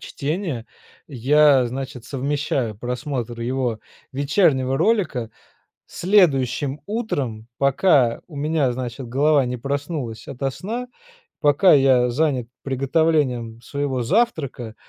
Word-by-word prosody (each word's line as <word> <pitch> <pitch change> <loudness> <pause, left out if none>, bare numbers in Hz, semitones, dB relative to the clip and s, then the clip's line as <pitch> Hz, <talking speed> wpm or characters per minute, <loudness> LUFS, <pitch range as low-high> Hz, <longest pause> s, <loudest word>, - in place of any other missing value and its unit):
чтение, 150 - -4 0.4
я, 140 0 +4
значит, 130 -1 -6
совмещаю 135 -4 -2
просмотр 120 0 -4
его 120 -2 -1 0.3
вечернего 140 -2 +2
ролика 155 - 0 0.6
следующим 145 - +2
утром, 140 - -3
пока 140 -3 +3
у 155 -5 -10
меня, 150 -2 +1
значит, 125 +1 -5
голова 145 +3 +3
не 125 0 -3
проснулась 140 -3 -4
ото 135 +1 -2
сна, 225 - -5 0.5
пока 150 +6 +5
я 130 -3 +4
занят 130 -2 0 0.2
приготовлением 135 -4 0
своего 140 0 -2
завтрака, 140 - -1
135 Hz, 100 wpm, -22 LUFS, 125-150 Hz, 0.6 s, пока